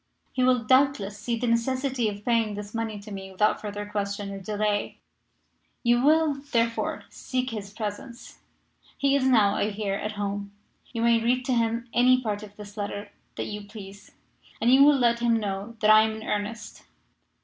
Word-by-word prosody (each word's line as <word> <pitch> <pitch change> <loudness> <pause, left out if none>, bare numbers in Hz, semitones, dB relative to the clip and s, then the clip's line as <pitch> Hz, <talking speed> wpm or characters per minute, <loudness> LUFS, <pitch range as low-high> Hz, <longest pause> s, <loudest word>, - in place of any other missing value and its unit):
He 255 - +1
will, 250 -2 +3
doubtless, 220 -5 +2
see 230 +2 -2
the 245 - -2
necessity 250 +1 0
of 205 0 -8
paying 230 -3 +1
this 205 0 -7
money 225 -2 -3
to 210 +1 -11
me 190 -1 -7
without 210 +3 +1
further 205 -1 -5
question 200 -1 -3
or 195 - -6
delay. 205 +1 -1 0.9
"You 240 0 +3
will, 310 0 +4
therefore, 230 0 0
seek 255 -1 -3
his 205 -3 -6
presence 220 +3 -7 0.6
he 280 0 +2
is 275 -2 +2
now, 215 -6 +4
I 205 - 0
hear, 205 -1 -3
at 210 +2 -3
home. 200 0 -4 0.4
You 230 -2 -2
may 235 -1 +4
read 250 +2 +1
to 255 - +1
him 235 0 0
any 255 +1 +5
part 210 -4 -3
of 205 -1 -11
this 210 0 -11
letter 205 0 -5 0.2
that - - -3
you 210 -1 -6
please, 200 -1 -12 0.5
and 240 +3 +4
you 270 +1 +8
will 290 0 +6
let 235 -2 +2
him 235 -1 +2
know 205 +2 -4
that 215 0 +5
I 215 0 +8
am 220 0 0
in - - -9
earnest. 210 +1 -4
220 Hz, 185 wpm, -26 LUFS, 205-240 Hz, 0.9 s, you